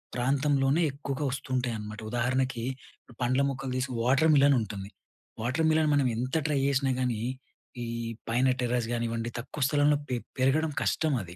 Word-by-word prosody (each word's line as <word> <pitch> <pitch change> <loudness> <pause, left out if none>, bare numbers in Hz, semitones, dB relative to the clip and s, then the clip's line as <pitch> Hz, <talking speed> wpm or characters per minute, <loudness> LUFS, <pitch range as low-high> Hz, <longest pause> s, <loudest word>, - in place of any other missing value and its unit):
ప్రాంతంలోనే 135 +4 +2
ఎక్కువగా 140 +1 -4
వస్తుంటాయి 130 -3 -2
అనమాట. 105 0 -7
ఉదాహరణకి, 125 0 0 0.6
పండ్ల 130 +2 +2
మొక్కలు 135 -1 -4
తీసి 130 +1 -1
వాటర్ 135 +6 +4
మిలన్ 140 0 +6
ఉంటుంది. 100 -2 -6 0.5
వాటర్ 130 +8 0
మిలన్ 155 -1 +3
మనం 140 -3 +3
ఎంత 130 +5 -2
ట్రై 150 -3 +1
చేసినా 135 -1 +2
గానీ, 120 -4 0 0.6
ఈ - - -3 0.4
పైన 125 +3 +3
టెర్రస్ 120 -1 0
గానివ్వండి, 115 0 -2
తక్కువ 140 +5 -7
స్థలంలో 145 0 +3
పె 125 - 0 0.2
పెరగడం 150 +4 +2
కష్టం 155 -2 +1
అవి. 90 0 -11
130 Hz, 150 wpm, -28 LUFS, 120-140 Hz, 0.6 s, మిలన్